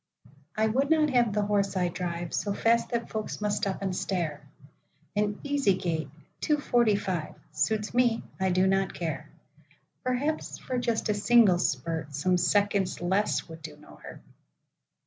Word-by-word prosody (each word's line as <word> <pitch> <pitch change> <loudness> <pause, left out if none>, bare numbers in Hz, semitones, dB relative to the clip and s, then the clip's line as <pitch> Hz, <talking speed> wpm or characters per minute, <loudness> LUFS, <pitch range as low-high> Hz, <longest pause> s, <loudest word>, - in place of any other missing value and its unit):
I 220 - +3
would 265 +6 +1
not 310 -2 +3
have 240 -4 +3
the 210 0 0
horse 200 -1 0
I 180 -1 +2
driveSo 175 +3 -3
fast 230 +1 +2
that 235 -1 -3
folks 215 -1 -4
must 210 -1 0
stop 195 0 -2
and 190 -2 -1
stare; 170 -6 -2 0.7
An 205 0 0
easy 280 -9 +2
gait—two 160 - -3
forty 240 -7 +3
five—Suits 200 +3 -2
me; 240 -2 +2 0.2
I 190 0 +1
do 185 +1 +3
not 195 0 +1
care;—Perhaps, 255 - -5
for 255 -1 -3
just 230 -3 -1
a - - +3
single 205 -3 +5
spurt, 155 0 -2
Some 180 +5 +2
seconds 200 +1 +1
less 190 +4 0
would 160 -1 -10
do 155 -2 -9
no 150 - -16
hurt. - - -11
200 Hz, 145 wpm, -28 LUFS, 175-230 Hz, 0.7 s, single